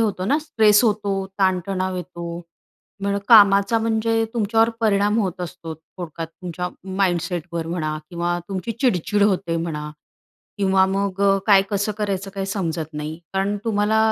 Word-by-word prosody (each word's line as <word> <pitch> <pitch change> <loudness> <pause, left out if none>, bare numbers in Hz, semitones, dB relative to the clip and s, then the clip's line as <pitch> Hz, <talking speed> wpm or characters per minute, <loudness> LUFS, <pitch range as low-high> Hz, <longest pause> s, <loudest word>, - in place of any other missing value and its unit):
होतो 205 -5 0
ना 280 +10 +2
स्ट्रेस 220 -9 +4
होतो, 200 -3 0
ताणतणाव 185 0 0
येतो. 170 -1 -6 0.6
म्हणून 200 0 -1
कामाचा 205 0 +6
म्हणजे 225 0 +1
तुमच्यावर 225 0 +3
परिणाम 210 0 +2
होत 185 -3 -3
असतो. 165 -2 -6
थोडक्यात 165 +1 -8
तुमच्या 180 +1 -6 0.3
माइंडसेटवर 175 -3 -1
म्हणा 155 -2 -2
किंवा 175 0 -1
तुमची 195 +3 -3
चिडचिड 205 - +1
होते 185 -4 +1
म्हणा 155 -3 -4 0.7
किंवा 190 -1 +4
मग 195 0 -2
अ, 195 0 +4
काय 200 -3 +6
कसं 205 +1 0
करायचं 200 -2 -2
काय 195 -1 -2
समजत 165 -5 -3
नाही 150 +1 -5
कारण 195 +2 0
तुम्हाला 215 -1 +1
195 Hz, 140 wpm, -22 LUFS, 175-205 Hz, 0.7 s, कामाचा